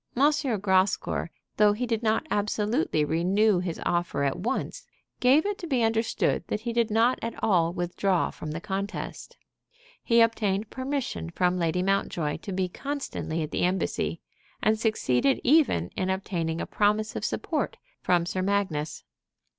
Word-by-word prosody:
Grascour, 210 - +2 0.3
though 210 -1 +5
he 240 +4 -2
did 230 -2 -1
not 220 +5 +1
absolutely 210 - +1
renew 185 +6 +2
his 175 -2 -4
offer 175 -5 0
at 140 -1 0
once, 215 +7 -3 0.3
gave 270 +7 +4
it 410 -1 -2
to 345 - -6
be 260 -6 +1
understood 225 0 +1
that 210 - -2
he 235 0 -3
did 235 -1 +2
not 230 +4 +3
at 230 - -4
all 170 -5 +3
withdraw 175 +1 0
from 155 - -7
the 155 +2 -4
contest. 200 +2 -5 0.7
He 235 -1 +4
obtained 215 -2 +1
permission 260 - -3
from 180 - +1
Lady 170 +1 0
Mountjoy 180 -6 0
to 195 - -8
be 185 0 0
constantly 270 - -4
at 155 - -6
the - - -1
Embassy, 185 +2 0 0.4
and 215 0 +2
succeeded 215 - +2
even 260 - +3
in 185 - -1
obtaining 175 -4 -2
a - - -2
promise 210 +1 +1
of - - -4
support - - -2 0.2
from 175 -1 +2
Sir 185 +2 -2
Magnus. 185 -6 -1
200 Hz, 155 wpm, -27 LUFS, 175-230 Hz, 0.7 s, though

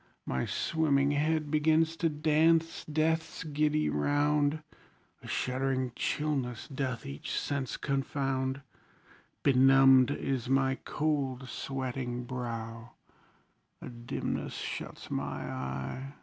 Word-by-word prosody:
My 65 -1 -1
swimming 145 -3 +2
head 150 +1 +1
begins 160 +1 +3
to 165 -1 +2
dance 160 +2 +2
death's 160 +1 0
giddy 150 0 +1
round; 145 - +1 0.6
A - - -11
shuddering 130 0 -1
chillness 135 -6 -1
doth 130 -5 -3
each 70 +1 -3
sense 135 -6 -2
confound; 135 -1 -1 0.8
Benumbed 135 -1 +6
is 130 -3 -2
my 135 0 +2
cold 140 -4 -1
sweating 130 -2 -3
brow 115 -2 -5 0.9
A - - -8
dimness 120 0 -4
shuts - - -6
my - - -3
eye. 65 - -5
135 Hz, 100 wpm, -30 LUFS, 125-150 Hz, 0.9 s, Benumbed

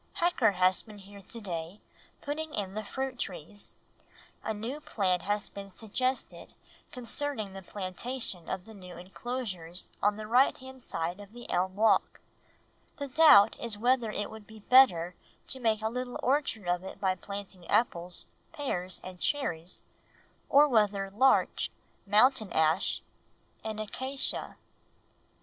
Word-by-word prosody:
"Hacker 310 - +3
has 185 0 +3
been 215 -2 -13
here 200 0 -12
to 230 +4 -9
day, 175 -1 -5 0.4
putting 305 +2 -3
in 195 -2 -3
the 215 +1 -3
fruit 265 +4 -4
trees. 195 +2 -6 0.7
A - - -1
new 225 +7 -4
plan 190 -10 0
has 205 +3 -1
been 200 0 -9
suggested 255 +6 -3 0.4
concerning 250 -4 -4
the 195 - -7
plantation 190 +1 -5
of 185 0 -3
the 225 - -12
new 180 -4 -11
enclosures 185 -2 -4
on 205 0 +3
the 215 0 -6
right 245 +5 +4
hand 260 0 -11
side 170 -2 -3
of 205 +1 -12
the 240 0 -10
elm 185 +1 +1
walk; 220 +2 +3 0.8
the 285 - -4
doubt 250 -8 +7
is 230 -3 -3
whether 240 0 +2
it 210 -1 -3
would 220 -1 -11
be 220 -1 -13
better 190 -9 +6 0.4
to 265 - -3
make 220 -3 +1
a - - +2
little 250 +2 -4
orchard 255 -7 +1
of 175 +1 +1
it 190 - -8
by 190 -2 +2
planting 195 -1 -8
apples, 180 -5 0 0.3
pears, 185 - -2
and 185 -1 -9
cherries, 175 - -2 0.7
or 290 +2 +7
whether 205 -6 +2
larch, 260 +7 +3 0.4
mountain 220 +1 +4
ash, 160 0 +2 0.6
and 220 -1 -4
acacia." 260 +6 -3
210 Hz, 145 wpm, -30 LUFS, 185-250 Hz, 0.8 s, doubt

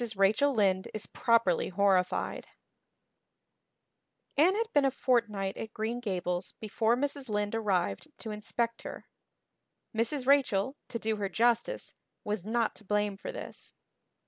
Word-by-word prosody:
Rachel 210 +9 +4
Lynde 195 -6 +2
Is 215 - -4
Properly 230 -7 +2
Horrified 190 -1 +1 1.9
ANNE 340 +7 +5
had 455 +1 -2
been 290 - +5
a 270 - +4
fortnight 220 -7 0
at 220 0 -7
Green 225 +2 -2
Gables 180 -5 -2
before 220 +2 +1
Mrs. 280 -1 -2
Lynde 210 0 -1
arrived 190 - 0
to 220 - -6
inspect 230 +2 -2
her. - - -8 0.9
Mrs. 250 +4 +1
Rachel, 265 -4 +3
to 230 - -4
do 220 -1 -1
her 200 -1 -2
justice, 240 - +1 0.3
was 210 -3 -2
not 225 +2 0
to - - -16
blame 210 0 0
for 195 - -6
this. - - -9
220 Hz, 135 wpm, -30 LUFS, 200-245 Hz, 1.9 s, ANNE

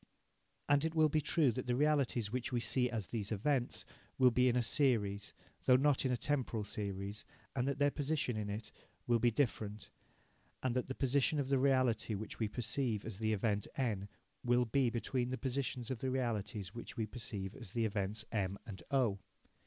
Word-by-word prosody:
And 145 0 +4
it 160 0 -1
will 155 -1 +5
be 155 +1 +2
true 150 -2 +3
that 125 +3 -4
the 120 - +2
realities 135 -6 +2
which 125 0 -2
we 125 - +1
see 125 +1 +1
as 110 -5 -3
these 105 -3 -3
events 120 0 0 0.3
will 130 -1 +6
be 125 +2 +4
in 120 - +1
a 125 - +3
series, 105 -4 +1 0.3
though 125 - +7
not 140 +1 +3
in 130 - +2
a 125 - +1
temporal 125 -6 0
series, 100 0 -4 0.3
and 125 0 +1
that 140 - 0
their 145 0 +3
positions 145 -6 -1
in 105 -1 -3
it 105 +2 -5 0.3
will 120 -1 +3
be 120 +2 +4
different, 110 -4 -1 0.7
and 130 -2 0
that 125 - 0
the 130 - -4
position 140 +3 +2
of 135 -2 -1
the 135 -1 +3
reality 130 -5 +2
which 110 +2 -6
we 110 - +1
perceive 115 0 -1
as 105 -3 -6
the 110 -1 +1
event 105 -1 0
N 105 -6 -1 0.3
will 120 0 +3
be 125 +2 +2
between 120 +2 -1
the 130 - -2
positions 130 -2 -2
of 125 - -3
the 130 - -1
realities 110 -6 -2
which 120 - -8
we 110 - 0
perceive 105 -3 -5
as 115 -8 -10
the 115 -1 +1
events 105 +1 -1
M 100 -3 -1
and 95 -5 -8
O. 120 -8 +2
120 Hz, 200 wpm, -35 LUFS, 105-130 Hz, 0.7 s, though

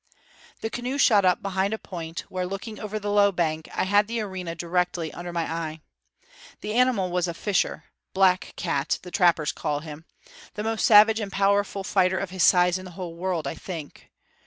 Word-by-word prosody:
The 220 - -3
canoe 250 +3 -3
shot 210 -8 +5
up 180 -1 +2
behind 195 +2 0
a - - -8
point 170 -5 -7
where, 185 -1 -4
looking 195 +3 -6
over 215 0 -4
the 205 -1 -3
low 205 0 +4
bank, 160 -3 -2
I - - -1
had 205 +2 +3
the 230 +1 -2
arena 190 -5 -5
directly 175 -1 -1
under 175 0 -6
my 170 -1 -1
eye. 160 -1 -4 0.8
The 210 - -4
animal 235 -7 +2
was 180 0 0
a 170 - -4
fisher 200 +2 -1 0.3
black 190 -1 +3
cat 140 -1 -1
the 180 - -10
trappers 170 -5 +3
call 145 0 -3
him 155 0 -10 0.5
the 210 - -3
most 225 0 0
savage 220 +1 +7
and 205 -3 -4
powerful 200 0 +1
fighter 190 -1 +2
of 195 -2 -4
his 185 -1 -3
size 180 +1 +5
in 185 - -10
the 180 - -9
whole 180 -3 -5
world, 175 -2 -2
I 140 - -2
think. 165 -3 -9
185 Hz, 195 wpm, -25 LUFS, 170-205 Hz, 0.8 s, savage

